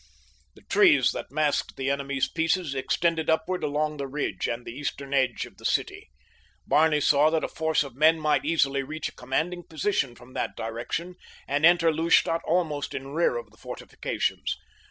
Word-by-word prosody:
The - - -18
trees 380 -7 +5
that - - -6
masked 150 0 0
the 135 +1 -1
enemy's 140 -1 -1
pieces 165 -1 0
extended 160 +4 0
upward 160 +3 0
along 150 +1 -1
the 140 -1 -4
ridge 140 +2 -2
and 120 +1 -4
the - - -6
eastern 140 0 -5
edge 130 -2 +1
of - - -16
the - - -17
city. - - -1 0.6
Barney 155 0 +3
saw 145 +1 +4
that 160 0 0
a - - 0
force 160 -1 0
of 135 -4 -10
men 160 +3 +4
might 150 -1 +2
easily 140 -3 +1
reach 155 +3 -4
a - - -20
commanding 160 +8 -2
position 160 -6 -1
from 125 +2 -16
that - - -3
direction 120 +11 -4 0.3
and 145 +3 +4
enter 170 -2 +4
Lustadt 165 +1 +3
almost 160 -4 -1
in 135 +1 -5
rear 160 -6 +2
of 115 -3 -8
the 110 - -22
fortifications. - - -3
150 Hz, 175 wpm, -26 LUFS, 135-165 Hz, 0.6 s, trees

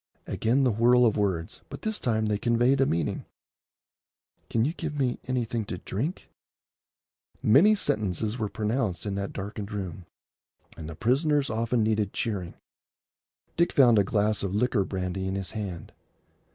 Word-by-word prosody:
Again 125 +5 +1
the 130 - +3
whirl 120 +3 +4
of 110 - +3
words, 85 -6 -2
but - - -9
this 220 -1 -2
time 110 -3 0
they 105 -1 0
conveyed 120 +4 +2
a 135 - +4
meaning. 80 -3 -1 1.3
"Can 115 0 +1
you 155 - -1
give 160 -3 -5
me 130 -3 0
anything 120 -3 -1
to 90 - -5
drink?" 130 - -4 1.2
Many 170 - +6
sentences 110 - -1
were 105 -2 -1
pronounced 110 -2 -2
in 100 - -2
that 100 0 -3
darkened 100 +1 -6
room, 95 -4 -5 0.7
and 80 - -8
the 80 - -7
prisoners 140 - +1
often 115 +1 0
needed 105 -2 0
cheering. 100 -8 -3 1.0
Dick 170 +1 +3
found 120 -6 +6
a - - +4
glass 105 +2 +1
of 100 0 -2
liqueur 110 -3 +1
brandy 95 0 -3
in 95 - -2
his 95 -1 -3
hand. 100 -6 -6
110 Hz, 155 wpm, -27 LUFS, 100-125 Hz, 1.3 s, Many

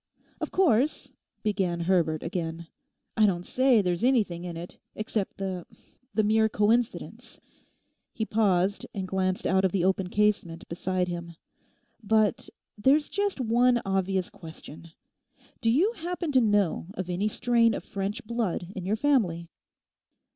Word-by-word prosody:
'Of - - -3
course,' 300 - +2 0.3
began 190 -5 0
Herbert 170 -3 +1
again, 165 -1 -4 0.5
'I 215 - +6
don't 180 -2 -1
say 255 -4 +3
there's 180 +2 -1
anything 210 -9 +1
in 170 -2 -5
it—except 200 +4 -5
the—the 195 +5 -5
mere 220 +1 +3
coincidence,' 225 +3 -1 0.7
he 220 - -3
paused 200 -3 +1
and 190 -2 -3
glanced 185 0 -1
out 190 0 +2
of 190 - +2
the 185 -2 +1
open 190 -1 +1
casement 200 -5 0
beside 180 +1 -1
him. 170 -1 -6 0.7
'But 215 -1 +1 0.3
there's 275 +8 +3
just 405 -5 -1
one 245 +1 +3
obvious 190 -1 0
question. 160 0 -11 0.7
Do 225 - +2
you 330 - +3
happen 345 -5 -4
to 260 -2 +4
know 205 -7 +1
of 185 - -4
any 180 +4 -1
strain 230 0 +2
of - - -5
French 200 +2 -4
blood 215 -6 -2
in 185 -1 -5
your 210 - +2
family? 200 - +1
200 Hz, 135 wpm, -27 LUFS, 180-230 Hz, 0.7 s, I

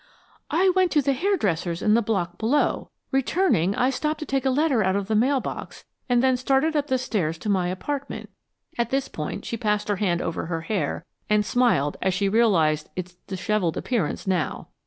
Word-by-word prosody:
"I 360 +5 +3
went 370 -2 +3
to 300 - +4
the 275 - +2
hairdresser's 200 - 0
in 210 - +4
the 230 - +4
block 185 -6 -2
below. 250 +7 +1 0.2
Returning, 265 - +2
I 255 +2 +2
stopped 305 +3 -2
to - - -3
take 270 -1 0
a - - +4
letter 265 -4 +2
out 190 0 +1
of 200 -1 -1
the 220 - -1
mail 260 +6 +3
box - - -7 0.2
and 245 0 +3
then 260 -1 +3
started 270 +5 +1
up 295 -1 +1
the 260 - +2
stairs 185 -10 -1
to 210 - -5
my 185 -3 +2
apartment." 275 +10 -4 0.5
At 235 -1 +1
this 270 +1 0
point 150 - -5
she 230 - -3
passed 210 -2 -1
her 205 - +1
hand 180 -4 +1
over 165 - -3
her 165 -1 -2
hair 200 +3 -2 0.2
and 210 0 +3
smiled 220 - +2
as 190 -1 +1
she 200 +1 +1
realized 175 -9 +2
its 180 -1 -5
disheveled 190 -3 -1
appearance 220 -12 -1
now. 185 -5 -1
220 Hz, 200 wpm, -24 LUFS, 185-270 Hz, 0.5 s, to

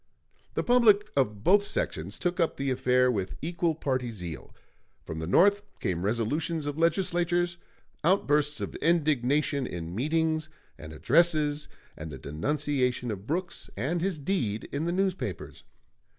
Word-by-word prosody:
The - - 0
public 215 -4 +4
of 105 -6 0
both 205 +5 +4
sections 85 +6 -3
took 180 0 -1
up 165 - +1
the 135 -1 -1
affair 125 0 +3
with 95 -5 -3
equal 170 0 -1
party 130 -5 -1
zeal. 90 -8 -7 0.5
From 80 - -5
the 80 - -4
North 200 - +5 0.2
came 90 -1 -2
resolutions 145 - -1
of 145 +1 -4
legislatures, 175 0 +2 0.5
outbursts 150 -4 +2
of - - -4
indignation 145 -4 +1
in 85 -1 -6
meetings 155 - 0 0.3
and 75 +1 -10
addresses, 150 - +2 0.3
and 80 0 -7
the 70 - -7
denunciation 125 - -1
of 100 0 -7
Brooks 175 +3 -3
and 155 - -1
his 185 -2 -1
deed 140 - -2
in 145 +3 -2
the 170 - 0
newspapers. 190 0 -2
145 Hz, 140 wpm, -28 LUFS, 115-170 Hz, 0.5 s, North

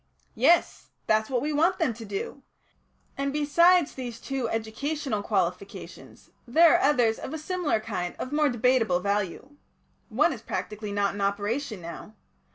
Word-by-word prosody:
"Yes. 345 0 +2 0.2
That's 215 0 +2
what 255 -2 0
we 300 +1 -1
want 335 +5 +2
them 320 -9 +1
to 225 +1 -10
do. 205 +7 -5 0.8
And, 275 0 0
besides 330 +3 +4
these 245 -3 -6
two 265 -4 -3
educational 225 +2 -2
qualifications, 195 -2 -4 0.2
there 325 +7 +6
are - - -2
two - - +3
others 225 -2 +2
of 295 - -6
a - - -3
similar 330 -5 -1
kind 185 -5 -4
of 255 - -5
more 300 -1 +3
debateable 240 -6 +2
value. 205 +7 -2 0.5
One - - +2
is - - -9
practically 210 -1 -5
not 200 -1 0
in 200 - -5
operation 205 +3 -2
now. 170 +5 -9
235 Hz, 160 wpm, -27 LUFS, 205-290 Hz, 0.8 s, there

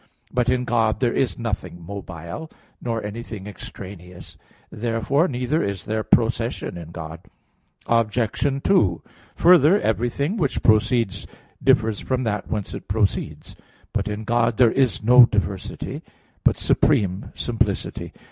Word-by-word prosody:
But 125 -1 +1
in 125 0 +1
God 115 -2 +1
there 125 -2 +1
is 135 - 0
nothing 105 -7 -4
mobile, 90 - -7 0.3
nor 115 -2 -2
anything 105 -1 -6
extraneous. 90 -3 -10 0.4
Therefore 115 - 0
neither 130 +4 -1
is 100 -2 -3
there 110 0 -2
procession 115 +2 +1
in 85 -2 -8
God. 80 -1 -7 0.7
Obj. 115 +4 0
2: 100 - +3 0.3
Further, 175 +2 +6
everything 120 - -1
which 145 -9 -1
proceeds 110 -2 +2 0.4
differs 110 -2 +3
from 130 -1 -1
that 105 -3 -2
whence 105 -3 -3
it - - -8
proceeds. 100 -1 -2 0.4
But - - -1
in 105 +1 -4
God 115 0 +1
there 120 -3 +5
is 130 -5 +1
no 125 +1 +8
diversity; 100 -3 -3 0.4
but - - +3
supreme 95 -2 +1
simplicity. - - -2
115 Hz, 130 wpm, -23 LUFS, 100-125 Hz, 0.7 s, no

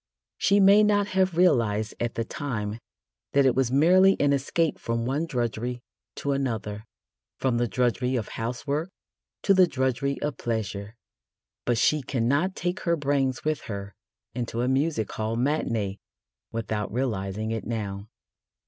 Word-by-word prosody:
She 200 +1 +4
may 200 +2 +7
not 205 -1 +3
have 185 -2 +1
realised 110 - +3
at 120 -1 -2
the 115 - 0
time 110 -6 -4 0.5
that 140 -1 +4
it 130 - +5
was 130 -2 +1
merely 185 +7 +5
an 145 0 +3
escape 150 +4 0
from 115 0 -2
one 145 +6 -1
drudgery 120 -2 -2 0.3
to 140 - -2
another 110 -6 -2 0.5
from 130 -3 +1
the 120 - +1
drudgery 125 +3 0
of 115 -4 -2
housework 140 +8 -3 0.5
to 200 - +5
the 185 -1 +6
drudgery 130 0 -1
of 145 -4 -2
pleasure 105 -2 -3 0.7
but 120 -1 +1
she 150 +5 +3
cannot 140 +9 0
take 175 +1 -2
her 170 -2 +1
brains 140 -4 0
with 155 -1 0
her 100 -1 -5 0.4
into 120 -1 -3
a - - +1
music 135 -4 0
hall 110 +1 -2
matinée 115 -7 -1 0.5
without 110 -2 -3
realising 110 -3 -2
it 115 -2 -3
now. 105 -3 -4
125 Hz, 150 wpm, -26 LUFS, 110-150 Hz, 0.7 s, may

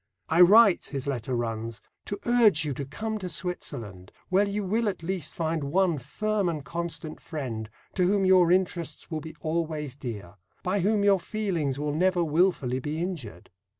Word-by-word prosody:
"I 165 +2 +4
write," 205 +2 +7
his 135 -2 -5
letter 130 -2 -2
runs 115 -1 -3 0.3
to 205 - -4
urge 220 -10 +4
you 145 - -1
to 140 +2 -5
come 220 +9 -4
to 185 -2 -4
Switzerland, 120 - -5 0.2
where 195 +2 +3
you 205 +1 -2
will 215 +3 +1
at 185 - -6
least 175 -3 -3
find 165 -3 -2
one 170 +1 +2
firm 210 - -1
and 155 -5 -4
constant 165 0 -5
friend, 120 -9 -5 0.2
to 180 -2 +2
whom 195 0 +2
your 185 -2 +5
interests 175 -4 -1
will 155 -1 -2
be 160 +1 -9
always 155 -4 -2
dear 105 -9 -7 0.3
by 190 +3 0
whom 205 +2 +2
your 200 -1 +5
feelings 175 - -2
will 145 0 -2
never 180 +2 +2
wilfully 155 -6 +1
be 150 +4 -4
injured. 145 - -5
165 Hz, 175 wpm, -27 LUFS, 140-190 Hz, 0.3 s, write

